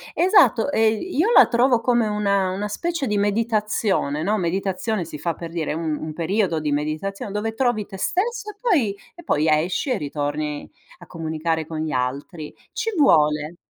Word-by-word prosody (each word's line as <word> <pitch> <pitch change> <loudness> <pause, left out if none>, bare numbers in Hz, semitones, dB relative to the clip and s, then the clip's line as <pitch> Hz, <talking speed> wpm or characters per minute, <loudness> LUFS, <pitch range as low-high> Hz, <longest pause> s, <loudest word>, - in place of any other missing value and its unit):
Esatto, 285 - +4
ehm, 220 -2 +2
io 360 - 0
la - - +8
trovo 240 0 +3
come 240 -1 +2
una 200 -2 +1
una 200 +3 -3
specie 335 +6 -2
di 210 -3 0
meditazione, 210 -7 0
no, 205 +6 +1
meditazione 190 +3 -1
si 155 -2 -8
fa 165 +2 -2
per 165 +1 -8
dire, 165 -3 -2
un 160 -1 -2
un 155 - -6
periodo 170 +1 0
di 150 -1 -2
meditazione 155 +8 -3
dove 215 +2 -2
trovi 230 -4 0
te 195 - -9
stesso 425 - -1
e 415 - -13
poi 290 - +1 0.2
e 345 - -13
poi 155 - +1
a 155 - +5
esci 180 - -2
e 250 - +1
ritorni 150 0 -3 0.3
a - - -14
comunicare 160 -1 -3
con 160 0 -6
gli 155 0 -2
altri. 140 +5 -3 0.2
Ci 455 -1 -2
vuole. 150 - +3
195 Hz, 180 wpm, -22 LUFS, 155-230 Hz, 0.3 s, la